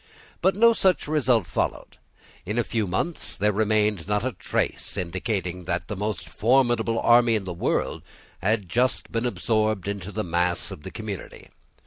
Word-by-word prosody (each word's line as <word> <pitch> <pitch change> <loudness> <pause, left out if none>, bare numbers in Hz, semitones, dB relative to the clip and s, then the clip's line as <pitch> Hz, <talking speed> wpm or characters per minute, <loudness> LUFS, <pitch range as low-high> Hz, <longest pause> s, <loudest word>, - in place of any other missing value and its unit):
But 190 +2 +3
no 230 +3 +6
such 190 -7 +2
result 130 - +2
followed. - - -3 0.4
In 105 +5 -3
a 120 - +3
few 110 -2 -1
months 125 - -2
there 105 +1 +2
remained 105 -3 +1
not 105 +2 0
a 130 - 0
trace - - -2
indicating 90 0 -3
that 85 0 -2
the 105 - -3
most 105 +2 -3
formidable 120 -1 +2
army 120 -1 +5
in 105 - -1
the 90 -2 -5
world 85 - -1 0.4
had 105 0 0
just 125 +7 0
been 115 +2 0
absorbed 110 -5 0
into 100 -1 -4
the 110 +2 -2
mass 85 0 0
of - - -8
the - - -7
community. - - -7
110 Hz, 165 wpm, -25 LUFS, 95-120 Hz, 0.4 s, no